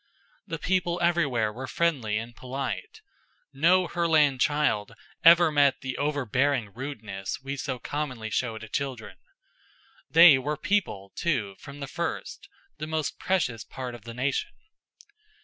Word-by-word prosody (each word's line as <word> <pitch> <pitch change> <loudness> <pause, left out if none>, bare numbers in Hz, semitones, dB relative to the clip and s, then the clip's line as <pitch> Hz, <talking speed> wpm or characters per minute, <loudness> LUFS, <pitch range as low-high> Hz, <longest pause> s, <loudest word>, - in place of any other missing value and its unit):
The 165 -3 -3
people 175 0 0
everywhere 145 -11 +1
were 130 +4 -6
friendly 130 -7 0
and 115 +1 -6
polite. 135 - -5 0.5
No 175 +6 +4
Herland 155 -6 +2
child 145 -8 +1 0.3
ever 170 -1 +7
met 145 -3 +3
the 130 -2 -4
overbearing 140 -5 0
rudeness 110 -7 -5
we 135 +1 -4
so 130 -2 -3
commonly 130 -4 -4
show 115 -1 -1
to 110 0 -9
children. 130 -1 -4 0.9
They 165 -4 +8
were 145 +3 -2
People, 155 - -1
too, 115 -13 -1
from 145 0 -11
the 140 - -4
first; - - -5 0.3
the 155 - -4
most 160 -1 -2
precious 130 - 0
part 125 -2 -7
of 115 -2 -11
the 115 0 -8
nation. 135 - -1
140 Hz, 135 wpm, -27 LUFS, 120-160 Hz, 0.9 s, They